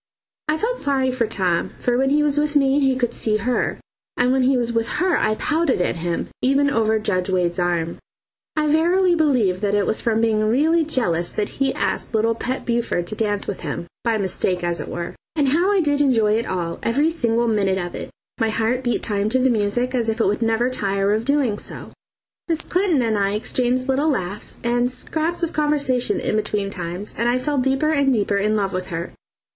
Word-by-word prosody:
I 305 +1 +1
felt - - -2
sorry 270 -2 +1
for 245 -3 0
Tom, 185 -5 0
for 245 - 0
when 265 +2 +2
he 295 +2 +3
was 295 0 +2
with 300 0 -1
me 275 0 +4
he 270 -2 +2
could 240 -2 -1
see 215 -1 0
her, 245 +4 -1 0.4
and 245 0 +3
when 265 0 +2
he 260 +1 +3
was 235 -1 -1
with 230 0 0
her 365 -1 +2
I 215 - +1
pouted 310 - 0
at 180 - 0
him, 170 0 -3
even 280 +2 +2
over 220 -3 +2
Judge 195 -4 -1
Wade's 180 -1 0
arm. 170 -2 -1 0.6
I 305 -1 +1
verily 345 +4 +3
believe 245 - +2
it 205 -1 +2
was 220 - 0
from 225 -1 +1
being 225 -1 +2
really 305 +10 +3
jealous 180 - 0
that 210 -1 -2
he 270 -1 -1
asked - - -2
little 225 +1 +2
Pet 255 +3 -4
Buford 235 -7 0
to 215 - -4
dance 205 -2 -1
with 200 - -4
him 160 +1 -4 0.2
by 230 -2 +1
mistake 185 -2 -1
as 175 0 -1
it - - -5
were. 170 0 -5 0.2
And 290 -4 +2
how 345 +8 +2
I 400 -2 +3
did 290 -2 +1
enjoy 225 -7 +3
it 230 +2 0
all, 170 -2 -3
every 285 +8 +1
single 235 -7 +1
minute 200 -4 +1
of 175 -2 -4
it! - - -6 0.3
My 225 -1 +2
heart 230 +4 0
beat 240 -1 -1
time 205 -1 0
to 255 - +2
the 260 0 +3
music 235 +4 0
as 235 -3 0
if 225 +2 -2
it - - +3
would 205 +4 0
never 225 +1 +2
tire 200 -3 0
of 220 +2 -1
doing 270 -7 +1
so. - - -6 0.6
Miss 330 -2 0
Clinton 355 -7 +1
and 220 -3 0
I 200 0 +1
exchanged 250 +3 0
little 275 +4 +1
laughs 200 -6 -3
and 240 +1 +1
scraps 320 +6 -2
of 335 - -1
conversation 285 -5 +1
in - - -1
between 210 -2 -1
times, 180 +3 -5
and 235 +1 0
I 245 - +2
fell 285 +2 -1
deeper 270 +4 +1
and 280 -3 +2
deeper 205 -4 +1
in 210 +2 +1
love 200 -2 -1
with 185 0 -3
her. 170 -1 -5
235 Hz, 215 wpm, -21 LUFS, 205-275 Hz, 0.6 s, me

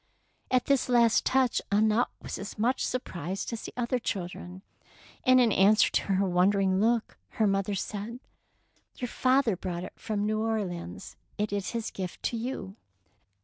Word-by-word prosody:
At 255 -1 +2
this 275 -2 +2
last 235 -2 +4
touch 260 -2 +2
Annette 215 +3 +3 0.2
was - - -5
as 200 - -7
much 240 +5 +1
surprised 190 - -3
as 230 - -4
the - - -8
other 245 +1 0
children, 180 -2 -5 0.6
and 255 -2 +6
in 240 -3 +4
answer 205 +3 +5
to - - +2
her 195 +1 +2
wondering 190 +1 +3
look 230 +2 +1
her 220 - +2
mother 195 0 +1
said, 210 +5 -5 0.4
— - - -41
Your 245 - -4
father 255 -5 +2
brought 175 -1 -4
it - - -8
from 210 -1 -2
New 215 0 0
Orleans; 175 - -4 0.2
it 210 0 -1
is 200 -2 -2
his 230 -2 -3
gift 185 -2 -6
to - - -1
you. 225 -4 -5
210 Hz, 165 wpm, -28 LUFS, 190-235 Hz, 0.6 s, and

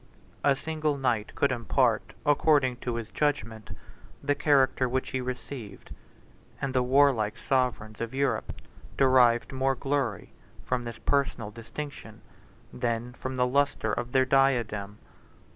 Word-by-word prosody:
A 140 -1 +4
single 155 0 -2
knight 120 -5 -1
could 140 - +2
impart, 120 -4 +1
according 145 -3 +3
to 120 -1 -4
his 115 -1 -5
judgment, 115 -8 -2 0.5
the 145 0 +2
character 135 -3 +2
which 130 +1 -2
he 130 - -1
received; 125 -4 -7 0.7
and 135 -1 -2
the 130 - +3
warlike 125 -5 +3
sovereigns 120 -5 -1
of 115 0 -3
Europe 140 +1 -1 0.5
derived 130 -3 +4
more 135 0 +1
glory 135 -6 -2 0.3
from 125 -1 -2
this 120 -1 -6
personal 135 -6 -1
distinction 115 -1 -8 0.5
than 120 0 -2
from 130 +1 -5
the 125 -1 +2
lustre 130 -4 +1
of 120 0 -3
their 130 0 +4
diadem. 120 -7 +1
130 Hz, 130 wpm, -28 LUFS, 115-140 Hz, 0.7 s, A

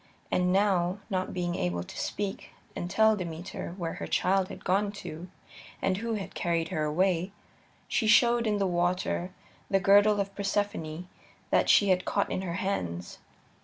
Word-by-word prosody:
And 180 0 +2
now, 190 -2 +2
not 185 -1 -1
being 175 -1 -2
able 90 - -1
to - - -11
speak 200 -1 -3 0.3
and 175 - -4
tell 220 +3 +4
Demeter 175 -1 -6
where 165 -3 -3
her - - -3
child 190 0 +2
had - - -10
gone 200 +2 +2
to 180 -3 -8 0.5
and 190 -1 0
who 230 +2 -2
had 200 -3 -6
carried 170 -1 -1
her 160 -5 -1
away, 180 +3 +1 0.6
she 220 - 0
showed 235 +1 +5
in 210 -1 +1
the 200 - +1
water 175 0 0 0.4
the 195 - +3
girdle 205 +2 +5
of 200 0 -2
Persephone 195 -5 -2 0.4
that - - +3
she 205 - +6
had 185 -1 +3
caught 200 - 0
in - - -1
her 175 -3 -3
hands. 90 - -3
185 Hz, 165 wpm, -29 LUFS, 175-200 Hz, 0.6 s, she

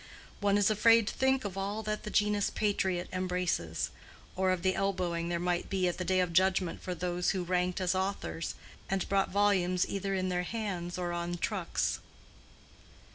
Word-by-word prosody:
One 205 0 +3
is 205 +1 +4
afraid 230 +1 +5
to - - -5
think 265 -2 +2
of 195 -2 -4
all 205 +3 -2
that 215 0 -2
the 210 - -6
genus 210 -1 +2
"patriot" 190 -4 0
embraces; 180 - -1 0.4
or 190 0 +2
of 185 -2 0
the 185 0 +3
elbowing 180 -4 -1
there 175 - 0
might 175 0 -1
be 190 -2 +1
at 175 - -2
the - - -1
day 185 +1 +2
of 180 -2 -1
judgment 185 -1 +2
for 180 - -4
those 180 0 -1
who 185 -2 0
ranked 180 +1 0
as 185 -1 +1
authors, 190 -3 -2 0.3
and 195 -1 0
brought 195 -1 +2
volumes 185 -3 +2
either 195 0 -2
in 185 0 0
their 180 -1 0
hands 180 -4 -3
or 175 -1 -2
on 175 0 -2
trucks. - - -1
185 Hz, 185 wpm, -31 LUFS, 180-200 Hz, 0.4 s, afraid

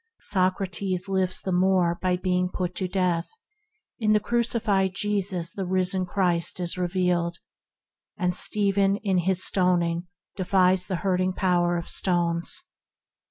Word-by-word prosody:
Soc 185 -1 0
rates 185 -1 -3
lives 190 -1 -1
the 190 - -3
more 180 -1 +1
by 180 -1 0
being 180 0 -1
put 180 -1 -4
to 185 - -2
death; 180 -2 -1 0.7
in 215 -2 +2
the 210 - +4
crucified 220 -4 0
Jesus 195 -4 -2
the 195 - -4
risen 185 0 +1
Christ 175 -2 +1
is 175 -1 -1
revealed, 175 -1 -1 0.8
and 180 -2 0
Stephen 200 0 +3
in 195 -3 +1
receiving 175 - -1
his 185 -1 +3
stoning 175 -2 0 0.3
defies 185 -1 +2
the 190 - -2
hurting 185 -1 +1
power 175 -2 +1
of 170 - -6
stones. 170 -2 +1
185 Hz, 140 wpm, -25 LUFS, 175-195 Hz, 0.8 s, the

